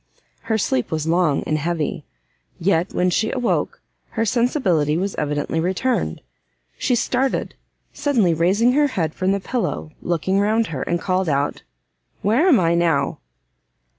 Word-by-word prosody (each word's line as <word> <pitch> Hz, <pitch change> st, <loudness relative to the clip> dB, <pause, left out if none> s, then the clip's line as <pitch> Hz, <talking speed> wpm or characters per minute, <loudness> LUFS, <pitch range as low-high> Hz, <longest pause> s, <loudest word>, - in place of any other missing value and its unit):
Her 220 Hz, -, +2 dB
sleep 130 Hz, -, 0 dB
was 155 Hz, -1 st, -2 dB
long 165 Hz, -3 st, +2 dB
and 155 Hz, 0 st, -1 dB
heavy; 165 Hz, 0 st, -2 dB, 0.5 s
yet, 175 Hz, 0 st, +1 dB
when 180 Hz, 0 st, +1 dB
she 220 Hz, +4 st, +1 dB
awoke, 250 Hz, -3 st, -1 dB, 0.3 s
her 225 Hz, -, +2 dB
sensibility 200 Hz, -, +1 dB
was 195 Hz, +3 st, -1 dB
evidently 150 Hz, +2 st, -2 dB
returned. 180 Hz, -, -1 dB, 0.6 s
She 250 Hz, -, +1 dB
started, 260 Hz, +3 st, 0 dB, 0.4 s
suddenly 230 Hz, -, +2 dB
raised 180 Hz, +7 st, +2 dB
her 295 Hz, +1 st, +4 dB
head 165 Hz, -, -2 dB
from 185 Hz, +1 st, 0 dB
the 200 Hz, -, +1 dB
pillow, 210 Hz, -7 st, -3 dB
looked 170 Hz, -1 st, -2 dB
round 205 Hz, +4 st, +2 dB
her, 130 Hz, -, -3 dB
and 175 Hz, 0 st, -1 dB
called 185 Hz, -1 st, 0 dB
out, 140 Hz, 0 st, 0 dB, 0.6 s
"where 235 Hz, -, +3 dB
am 295 Hz, -10 st, +6 dB
I 170 Hz, -2 st, +2 dB
now?" 165 Hz, -5 st, +1 dB
180 Hz, 145 wpm, -21 LUFS, 160-225 Hz, 0.6 s, am